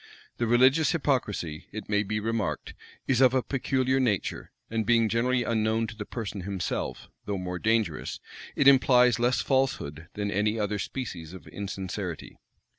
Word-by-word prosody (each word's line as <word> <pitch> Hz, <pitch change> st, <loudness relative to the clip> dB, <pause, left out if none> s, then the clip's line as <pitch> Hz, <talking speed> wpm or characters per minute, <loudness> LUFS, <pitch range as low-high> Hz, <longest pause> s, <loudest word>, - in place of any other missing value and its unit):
The 120 Hz, -, 0 dB
religious 130 Hz, +6 st, +4 dB
hypocrisy, 105 Hz, -, -1 dB
it 110 Hz, -1 st, -7 dB
may 105 Hz, -1 st, +2 dB
be 105 Hz, +1 st, -2 dB
remarked, 115 Hz, 0 st, -2 dB, 0.3 s
is 130 Hz, -1 st, +2 dB
of 130 Hz, 0 st, +5 dB
a 130 Hz, -, +2 dB
peculiar 130 Hz, -1 st, 0 dB
nature; 110 Hz, -8 st, -1 dB, 0.2 s
and 115 Hz, 0 st, -1 dB
being 115 Hz, 0 st, +3 dB
generally 120 Hz, +3 st, +1 dB
unknown 110 Hz, 0 st, +1 dB
to 110 Hz, 0 st, -8 dB
the 105 Hz, -2 st, -7 dB
person 105 Hz, -4 st, -5 dB
himself, 95 Hz, 0 st, -3 dB, 0.2 s
though 100 Hz, -1 st, -2 dB
more 90 Hz, -1 st, -4 dB
dangerous, 110 Hz, -7 st, 0 dB, 0.4 s
it 140 Hz, -, +3 dB
implies 125 Hz, -3 st, +6 dB
less 120 Hz, -1 st, +2 dB
falsehood 85 Hz, -, -1 dB
than 100 Hz, -1 st, -2 dB
any 105 Hz, +3 st, +1 dB
other 105 Hz, 0 st, -1 dB
species 90 Hz, -10 st, -5 dB
of 95 Hz, -, -11 dB
insincerity. 95 Hz, -3 st, -5 dB
110 Hz, 155 wpm, -27 LUFS, 100-125 Hz, 0.4 s, implies